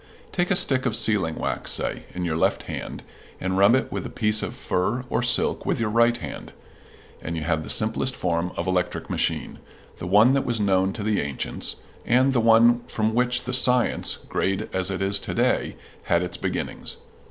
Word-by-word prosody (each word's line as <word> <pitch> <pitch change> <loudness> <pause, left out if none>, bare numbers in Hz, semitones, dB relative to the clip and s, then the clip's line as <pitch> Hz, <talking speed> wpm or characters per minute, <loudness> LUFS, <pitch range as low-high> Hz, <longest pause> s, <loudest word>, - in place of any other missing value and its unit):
Take 175 -1 -1
a 195 - +3
stick 135 -8 +2
of 110 - 0
sealing 105 -8 +1
wax, - - -3
say, - - -3
in 90 -1 -3
your 80 -2 -1
left 80 - +1
hand, - - -6 0.4
and 95 0 -2
rub 100 +5 +5
it 130 - -1
with - - -3
a - - -6
piece 105 -1 +1
of - - -5
fur 120 +8 -2
or - - +1
silk - - +3
with - - -1
your 110 -2 -1
right 115 +1 +3
hand, - - -8 0.7
and 80 +1 -4
you 80 - -3
have 80 -1 0
the 70 - -8
simplest 115 +4 0
form 85 0 -1
of 85 - -2
electric 95 -1 -2
machine - - -2 0.4
the 85 - -5
one 105 +7 +5
that 140 - +1
was 120 -2 -1
known 95 -2 +2
to 105 - -5
the 105 -1 +1
ancients, 70 -2 -3 0.3
and 130 +3 +3
the 120 - +2
one 115 +1 +5
from 110 0 -1
which 125 +1 +1
the 125 - -4
science, 125 -1 +3
great 95 +2 -2
as 95 0 0
it 95 0 -2
is 100 +1 +3
to - - -5
day, - - +1 0.3
had 85 +1 +2
its 90 - -4
beginnings. - - -3
105 Hz, 200 wpm, -24 LUFS, 90-120 Hz, 0.7 s, rub